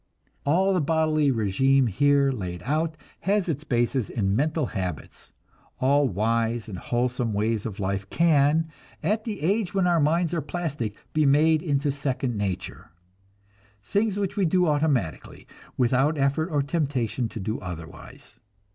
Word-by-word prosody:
All 190 +6 +3
the 180 - +2
bodily 155 -1 +2
régime 130 +4 +2
here 140 +6 +3
laid 90 -7 -5
out 155 +4 -1 0.2
has 200 -1 0
its 150 -3 -2
basis 120 -2 0
in 100 -3 0
mental 150 +4 +1
habits; 90 - -6 0.5
all 140 +2 +3
wise 115 +3 0
and 95 -5 -6
wholesome 120 -1 -1
ways 110 +1 0
of 105 -2 -8
life 95 0 -2
can, 160 -1 +3 0.4
at 215 +1 0
the 215 -4 -4
age 195 +3 0
when 190 -2 +2
our 175 -1 +3
minds 165 +3 +1
are 165 - 0
plastic, 145 -8 -4 0.2
be 155 -2 +3
made 155 +3 +4
into 145 -2 0
"second 135 -3 -2
nature" 100 -6 -4 0.9
things 205 - 0
which 200 -1 -2
we 200 -3 +2
do 180 +2 +3
automatically, 145 - -1 0.3
without 135 +5 +2
effort 140 +4 +1
or 145 -4 +1
temptation 135 - -1
to 115 - -7
do 110 +3 -3
otherwise. 85 -3 -10
140 Hz, 145 wpm, -25 LUFS, 115-160 Hz, 0.9 s, made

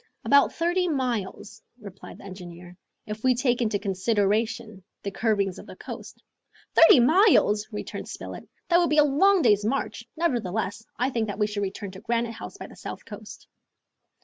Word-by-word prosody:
"About 280 0 +5
thirty 350 +2 0
miles," 235 - -3 0.2
replied 200 -3 -11
the - - -14
engineer, 180 -2 -10 0.3
"if 215 +1 -7
we 255 -1 +4
take 245 0 +1
into 215 -3 +1
consideration 210 +2 -1 0.2
the 200 - -3
curvings 200 -3 0
of - - -12
the - - -10
coast." - - -10 0.5
"Thirty 325 -4 +8
miles!" 250 - +4
returned 210 - -6
Spilett. - - -8 0.2
"That 345 0 +5
would 345 - +2
be 305 - +1
a 300 - +8
long 345 +6 +4
day's 205 0 +4
march. 255 +6 -2
Nevertheless, 225 - -1
I 255 +3 0
think 230 -3 -1
that 205 - -5
we 210 - +2
should 210 -1 -3
return 200 0 -4
to 190 +1 -11
Granite 235 0 -1
House 230 - -9
by - - -8
the - - -13
south - - -8
coast." - - -11
220 Hz, 175 wpm, -26 LUFS, 200-265 Hz, 0.5 s, Thirty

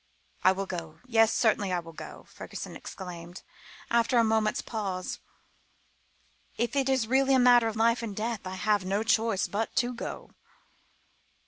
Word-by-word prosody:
"I 185 - +7
will 195 +1 -2
go 165 -4 -6
yes, 225 -3 +4
certainly 210 -4 +2
I 180 - +1
will 165 -1 -10
go," - - -10
Fergusson - - -8
exclaimed, 175 -1 -9 0.5
after 235 +1 +3
a 230 - +6
moment's 220 -1 +1
pause; 195 -5 -4 1.4
"if 235 +3 -1
it 270 -1 +1
is 260 -4 +2
really 265 +3 +3
a - - +5
matter 245 -2 +6
of 220 - -3
life 230 +2 +2
and 220 -4 -5
death, 220 -2 -3
I 185 - -5
have 205 +1 +1
no 195 +3 0
choice 225 -3 +2
but 220 +2 -3
to 245 +1 +1
go." 240 - -7
220 Hz, 160 wpm, -28 LUFS, 190-235 Hz, 1.4 s, I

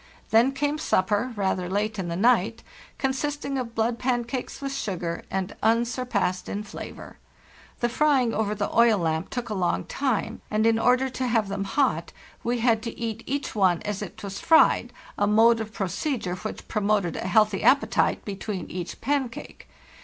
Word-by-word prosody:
Then 230 +4 +5
came 290 +2 -1
supper—rather 200 - 0
late 210 +2 -1
in 185 - -2
the 170 - -3
night—consisting 265 - -1
of 235 -2 -5
blood 230 +1 0
pancakes 245 0 -2
with 275 -1 -4
sugar, 180 -10 -3
and 190 +1 -3
unsurpassed 230 -4 0
in 205 +1 -3
flavor. 210 - -9 0.6
The 240 - +3
frying 265 -2 +2
over 210 -1 0
the - - -3
oil 235 -2 +5
lamp 160 0 -1
took 240 -2 -4
a - - -2
long 185 -3 0
time, 235 -5 -2
and 215 +1 +1
in 225 0 +4
order 250 +3 +3
to 255 0 -2
have 225 -4 +1
them 195 0 -2
hot 195 - 0 0.3
we 240 0 -1
had 230 -2 +3
to 230 0 -6
eat 225 -1 -3
each 280 +1 -2
one 185 -5 +2
as 205 -1 -3
it 205 +1 -8
was 200 0 -5
fried, 320 -1 +4 0.3
a 205 - +3
mode 225 +2 +5
of 220 -1 -5
procedure 200 - -2
which 205 +4 -6
promoted 205 -5 0
a - - -3
healthy 210 +1 +3
appetite 275 +2 +3
between 200 -2 -5
each 180 -1 -6
pancake. 265 -2 -3
225 Hz, 165 wpm, -25 LUFS, 195-250 Hz, 0.6 s, Then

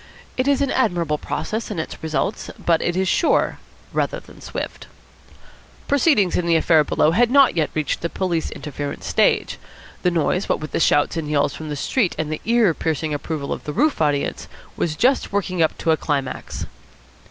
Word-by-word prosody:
It 255 +1 0
is 280 0 +3
an 275 - 0
admirable 175 - +1
process 220 +2 -3
in 210 - -4
its 160 - -5
results, 160 +6 -2
but 165 -2 +1
it 175 +1 -1
is 190 0 +1
sure 320 - +2 0.3
rather - - 0
than - - -16
swift. - - -6 1.0
Proceedings 280 - +3
in 175 - 0
the 170 - +4
affair 160 -1 +4
below 150 +1 +2
had 235 +7 +3
not 275 -4 +5
yet 155 -3 +1
reached 155 -2 -1
the 170 - -1
police 175 -4 -1
interference 145 -1 -6
stage. - - +1 0.4
The 180 - +3
noise, 175 +2 0
what - - +1
with 155 - -7
the - - -1
shots 145 0 +3
and 155 -2 -3
yells 145 -1 +1
from 155 -1 -7
the 150 - -3
street 190 - 0
and 155 -1 -2
the 155 - -4
ear 230 -6 +4
piercing 160 -1 -2
approval 145 0 -3
of - - -8
the 150 - -4
roof 300 - +1
audience, 145 -2 0 0.3
was 155 -3 -1
just 255 - +2
working 185 -3 -1
up 160 - +2
to 165 - +1
a 160 - +3
climax. 140 -4 -3
165 Hz, 190 wpm, -21 LUFS, 155-205 Hz, 1.0 s, not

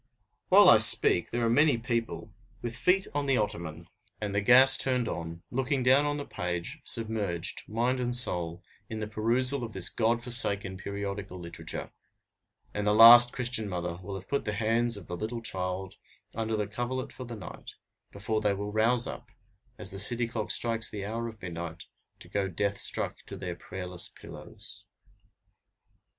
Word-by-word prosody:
While - - +7
I - - +8
speak, 85 - +5
there 120 0 -2
are - - +2
many 145 +3 +3
people, 115 -3 -4 0.3
with 120 -1 -4
feet 180 +9 +2
on 145 -1 -2
the 135 -2 +2
ottoman, 85 -6 -4 0.3
and 105 -2 -4
the 100 - 0
gas 130 +5 +7
turned 125 -3 +1
on, 85 0 -6
looking 135 +1 -1
down 135 +3 +4
on 145 0 -2
the 145 - -6
page, 90 - -5
submerged, 105 -7 -1
mind 120 +4 -1
and 120 -1 -1
soul, 90 -7 +2 0.3
in 110 - -5
the 105 - -3
perusal 120 +5 +2
of 115 -2 -7
this 95 -1 +1
God 115 +1 0
forsaken 100 -6 +2
periodical 100 -1 -6
literature; 85 -1 -7 0.8
and 105 0 -3
the 105 - +3
last 120 +2 +9
Christian 120 -4 0
mother 85 -2 -4
will 100 +1 -7
have 95 0 -9
put 140 - -2
the 105 - -3
hands 115 +2 0
of 95 - -11
the 90 - -6
little 110 +6 -5
child 95 -2 -3 0.4
under 110 0 -3
the 105 - -1
coverlet 120 +5 -5
for 130 - -9
the 120 -1 -8
night, 95 -5 -11 0.4
before 110 +2 -3
they 105 -2 0
will 100 +1 -5
rouse 115 +3 +1
up, - - -8 0.5
as 95 - -3
the 95 - -4
city 120 +4 +3
clock 115 -2 -5
strikes 115 -1 +3
the 100 -2 -6
hour 115 +3 -4
of 110 -2 -10
midnight, 85 -1 -7 0.4
to - - -13
go 100 -1 -2
death 100 +2 -2
struck - - -2
to - - -8
their 90 -2 -6
prayerless 90 -1 -6
pillows. - - -10
110 Hz, 175 wpm, -28 LUFS, 95-120 Hz, 0.8 s, last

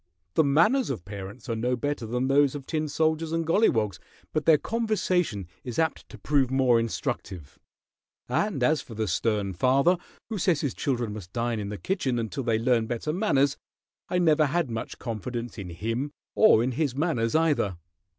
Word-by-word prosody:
The 160 - +4
manners 170 - +3
of 110 -10 -4
parents 100 +5 -8
are 115 - -1
no 125 +3 0
better 145 -2 -3
than 125 +3 -1
those 140 0 +3
of 140 -2 -6
tin 155 0 -1
soldiers 160 +1 0
and 165 0 0
golliwogs, 115 - +2 0.3
but 155 -1 -1
their 160 -2 +7
conversation 185 - -1 0.2
is 125 -3 -6
apt 160 -1 -1
to - - -11
prove 140 -4 +1
more 130 -3 +3
instructive; 95 -8 -4 0.7
and 135 - 0
as 155 +4 +3
for 115 - -11
the 110 0 -1
stern 100 0 0
father 135 - +3 0.3
who 220 -3 -3
says 170 -5 +2
his 140 -5 -1
children 120 -7 -2
must 95 -4 -9
dine 120 -1 -1
in 100 -1 -4
the 105 - -5
kitchen 130 - -1
until 115 +4 -3
they 115 -3 +1
learn 115 -1 +2
better 120 +6 -2
manners, 145 -8 +2 0.5
I 180 - 0
never 155 -3 +4
had 160 -3 0
much 115 0 -5
confidence 120 0 -5
in 95 -3 -6
him 115 - -3 0.2
or 215 - +6
in 130 - 0
his 135 0 -1
manners, 140 -7 0
either." 150 - +2
130 Hz, 180 wpm, -27 LUFS, 115-155 Hz, 0.7 s, their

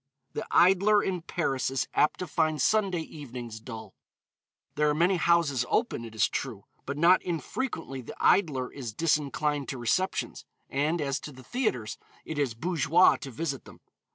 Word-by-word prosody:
The - - -4
idler 195 +3 +5
in 185 -2 -2
Paris 160 -7 -1
is 135 -2 -1
apt 150 - +3
to - - -1
find 155 -1 0
Sunday 195 -6 +2
evenings 125 -8 -8
dull. 110 -2 -9 0.8
There 150 0 +2
are 150 - +1
many 175 +4 +3
houses 165 -6 +2
open, 225 - 0
it 110 -1 -10
is 110 - +3
true, 115 -8 -5 0.2
but 140 +1 -3
not 175 +4 +5
infrequently 165 - -4
the 120 - -9
idler 145 -10 +2
is 120 -6 -6
disinclined 150 -2 0
to 135 - -4
receptions, 180 +11 -1 0.3
and 150 +5 0
as 140 -2 -1
to 150 - -8
the 130 -1 -13
theatres, 125 - -2 0.3
it 155 -2 -4
is 130 -6 0
bourgeois 165 +4 +4
to 140 - -8
visit 140 +1 -4
them. - - -14
150 Hz, 165 wpm, -28 LUFS, 130-175 Hz, 0.8 s, idler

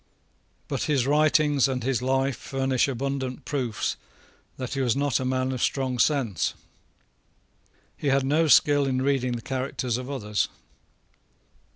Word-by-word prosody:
But - - -2
his 140 -5 +1
writings 150 -1 +3
and 130 -2 -2
his 130 -1 0
life 135 +1 +1
furnish 135 +1 0
abundant 135 0 -3
proofs 125 -7 -2 0.6
that 130 0 -5
he 135 - -1
was 125 -2 +1
not 140 -3 +1
a 130 - -3
man 130 0 0
of 130 -2 -4
strong 130 -2 0
sense. 115 - +1 1.4
He - - -4
had 135 0 +2
no 155 +4 +2
skill 145 -1 +5
in 130 -1 0
reading 135 -3 +1
the 120 -1 -5
characters 130 -2 -2
of 125 +1 -6
others. 105 -7 -1
135 Hz, 145 wpm, -26 LUFS, 125-140 Hz, 1.4 s, skill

